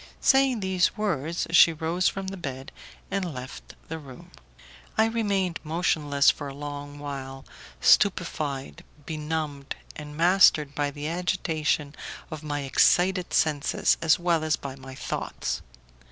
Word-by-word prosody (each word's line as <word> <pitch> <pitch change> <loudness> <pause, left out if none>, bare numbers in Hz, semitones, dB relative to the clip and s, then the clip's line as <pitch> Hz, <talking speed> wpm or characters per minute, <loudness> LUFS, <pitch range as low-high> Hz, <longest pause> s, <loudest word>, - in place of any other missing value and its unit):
Saying 265 -4 +4
these 190 +1 +1
words, 170 -6 -1
she 170 0 +8
rose 165 +3 0
from 195 -1 -2
the 195 - -6
bed 135 -6 -6 0.4
and 190 -3 -1
left 125 +1 -9
the 160 0 -5
room. 135 -4 -13 0.7
I 220 - +5
remained 200 -6 0
motionless 150 -3 +2
for 145 - -7
a 135 - -7
long 145 0 -7
while, 135 -2 -7 0.4
stupefied, 155 -8 +2 0.2
benumbed, 150 -3 -4 0.2
and 150 0 -9
mastered 165 -4 +5
by 145 -1 0
the 145 +1 -6
agitation 160 -4 -1 0.4
of 155 -2 -6
my 145 -1 -3
excited 180 +7 +3
senses 150 -2 +2
as 160 -1 +4
well 170 -2 +1
as 155 0 +2
by 135 -1 -7
my 130 -1 -11
thoughts. - - -4
155 Hz, 135 wpm, -26 LUFS, 145-180 Hz, 0.7 s, she